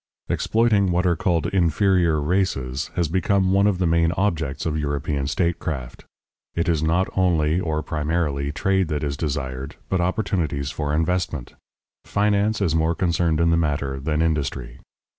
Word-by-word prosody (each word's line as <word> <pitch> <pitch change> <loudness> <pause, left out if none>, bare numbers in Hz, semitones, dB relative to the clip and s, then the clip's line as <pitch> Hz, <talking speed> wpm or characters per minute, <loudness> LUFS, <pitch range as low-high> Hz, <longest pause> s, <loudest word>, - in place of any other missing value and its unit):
Exploiting 110 -4 +2
what 90 +1 +1
are 85 -1 +3
called 85 -1 0
"inferior 90 -2 +2
races" 75 -5 -1
has 85 -2 +1
become 95 +2 +1
one 100 +1 +4
of 100 -3 +1
the 90 - 0
main 85 0 +3
objects 80 -7 -1
of 80 -2 -1
European 70 -1 -2
statecraft. 80 -7 -2 0.5
It 85 - 0
is 80 -3 +1
not 85 +4 +2
only, 85 -3 +2
or 80 -3 -2
primarily, 75 -2 -1
trade 95 +5 +1
that 75 -2 -2
is 70 -1 -1
desired, 70 -4 -4
but 95 -2 +1
opportunities 85 - -1
for 75 -1 -3
investment; 80 -4 -1 0.5
finance 105 +1 +1
is 85 -6 +1
more 80 +1 +1
concerned 85 -2 +1
in 85 0 +3
the 85 - +3
matter 70 -4 -1
than 75 +3 0
industry. 70 -6 -2
80 Hz, 155 wpm, -23 LUFS, 75-90 Hz, 0.5 s, one